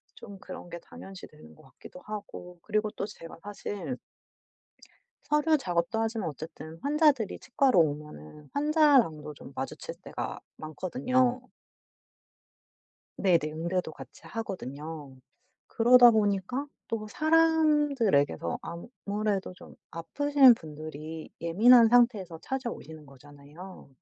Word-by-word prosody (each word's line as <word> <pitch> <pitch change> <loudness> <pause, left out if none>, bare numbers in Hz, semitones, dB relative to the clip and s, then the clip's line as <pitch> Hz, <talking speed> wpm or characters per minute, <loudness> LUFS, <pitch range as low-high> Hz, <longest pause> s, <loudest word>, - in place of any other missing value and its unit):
좀 200 -2 -11
그런 185 -2 -10
게 170 - -6
당연시되는 85 - -13
것 - - -19
같기도 180 - -14
하고 180 -4 -8
그리고 215 0 -1
또 - - -4
제가 165 -6 -11
사실 205 +4 -6 1.3
서류 300 +1 +2
작업도 180 0 -1
하지만 225 -4 -2
어쨌든 160 +2 -9
환자들이 285 - +2
치과로 260 -5 +2
오면은 150 - -4
환자랑도 280 - +3
좀 - - -13
마주칠 - - -6
때가 - - -6 0.2
많거든요. 250 - 0 1.8
네네. 185 -4 +3
응대도 170 +1 -2
같이 - - -13
하거든요. 155 - -7 0.5
그러다 245 +1 +7
보니까 210 +5 0 0.2
또 215 -2 -3
사람들에게서 295 - +2 0.5
아무래도 205 -2 -1
좀 - - -14 0.2
아프신 265 - +4
분들이 155 -1 -9
예민한 225 +8 +6
상태에서 220 -8 +3
찾아오시는 230 - -6
거잖아요. 145 +6 -14
195 Hz, 270 characters per minute, -28 LUFS, 155-250 Hz, 1.8 s, 그러다